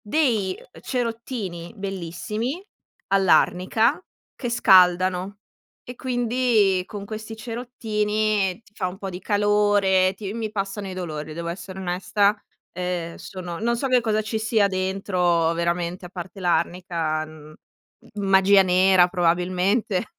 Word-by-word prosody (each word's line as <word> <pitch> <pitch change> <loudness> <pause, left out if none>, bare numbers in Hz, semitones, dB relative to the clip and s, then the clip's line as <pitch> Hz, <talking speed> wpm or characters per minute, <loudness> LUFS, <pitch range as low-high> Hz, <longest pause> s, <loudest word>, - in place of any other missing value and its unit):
dei 215 -6 +1 0.2
cerottini 230 -8 -4
bellissimi, 195 - -4 0.5
all'arnica, 195 - +3 0.3
che 245 - -4
scaldano 185 -2 +4 0.5
e 245 - -8
quindi 240 -6 +1
con 200 0 -7
questi 220 +1 -7
cerottini 215 -4 -1
ti 210 - -24
fa 185 - -2
un 185 +2 -9
po' 195 -2 -5
di 180 +1 -7
calore, 205 -2 +3
ti 200 0 -5
mi 225 -1 -4
passano 195 0 -4
i 185 - -6
dolori, 155 -4 -5
devo 170 +1 -6
essere 185 +2 -6
onesta, 195 +3 +1 0.4
ehm, 180 -2 -3
sono 180 -2 -7
non 235 +1 +1
so 270 - -2
che 255 -1 +4
cosa 215 -2 0
ci 220 +1 -3
sia 220 -1 +2
dentro 185 -3 +1
veramente 170 +1 -2
a - - -10
parte 185 +1 -8
l'arnica, 170 -2 0
mhmm, 155 -1 -13 0.6
magia 195 -1 +5
nera 185 0 +5
probabilmente. 180 +4 +1
195 Hz, 125 wpm, -23 LUFS, 180-215 Hz, 0.6 s, magia